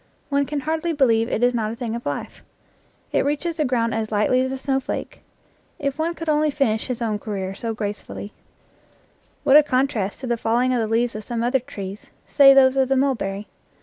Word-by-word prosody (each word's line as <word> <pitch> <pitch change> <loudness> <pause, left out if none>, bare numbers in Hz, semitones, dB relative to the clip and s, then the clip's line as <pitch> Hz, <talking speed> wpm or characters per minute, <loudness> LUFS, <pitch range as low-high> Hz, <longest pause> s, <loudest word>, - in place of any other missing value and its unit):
One 280 -1 +1
can 295 -1 -3
hardly 320 +3 -1
believe 230 -5 +2
it 230 - -1
is 245 0 +4
not 220 -2 -1
a - - -5
thing 235 -2 -4
of 235 - -6
life. - - -5 0.7
It - - +2
reaches 300 +4 -2
the 305 - +1
ground 235 -3 0
as 220 -1 -2
lightly 215 +4 +2
as 260 0 -1
a 265 - -3
snowflake. 270 0 -3 0.6
If 280 0 -3
one 335 +2 -1
could 330 - -7
only 305 0 +2
finish 235 -7 0
his 245 -2 -3
own 215 -2 -1
career 195 -3 -4
as 225 +2 -4
gracefully*. 205 0 -6 1.1
What 285 0 +7
a - - +9
contrast 255 -8 -1
to - - -4
the 240 -1 0
falling 240 +3 +1
of 245 - +1
the 225 - 0
leaves 230 +2 +1
of 215 - -6
some 230 +1 -3
other 250 +3 +2
trees, 205 -6 -8 0.2
say 275 -1 +7
those 270 -1 +6
of 265 -1 +2
the 270 - +2
mulberry! 215 -7 -1
250 Hz, 210 wpm, -22 LUFS, 225-280 Hz, 1.1 s, a